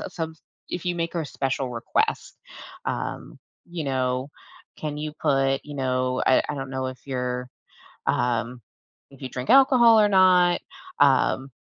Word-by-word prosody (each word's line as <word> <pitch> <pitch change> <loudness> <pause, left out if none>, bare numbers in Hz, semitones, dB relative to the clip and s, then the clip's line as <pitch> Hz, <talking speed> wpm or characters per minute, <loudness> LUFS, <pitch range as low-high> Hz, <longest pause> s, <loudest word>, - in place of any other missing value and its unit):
s - - -8
some 160 -2 -4 0.3
if 180 - -5
you 175 - 0
make 170 -1 -3
her 170 - -1
a - - -6
special 135 -1 -2
request, 115 -1 -2 0.5
um, - - -5 0.3
you 170 -2 -5
know, 130 0 -1 0.5
"Can 150 -1 -5
you 150 0 -4
put, 135 -2 +2
you 145 -1 -9
know" 130 -1 -1
I 130 - +5
I - - -2
don't 135 -1 -6
know 130 -1 -3
if 130 0 -8
you're, 125 -1 -3 0.6
um, 120 0 0 0.5
if 135 - -17
you 130 - -4
drink 125 0 -5
alcohol 255 -4 +6
or 210 - +4
not. 185 -2 +4 0.4
Um, 135 -1 +3
135 Hz, 160 wpm, -24 LUFS, 130-170 Hz, 0.6 s, alcohol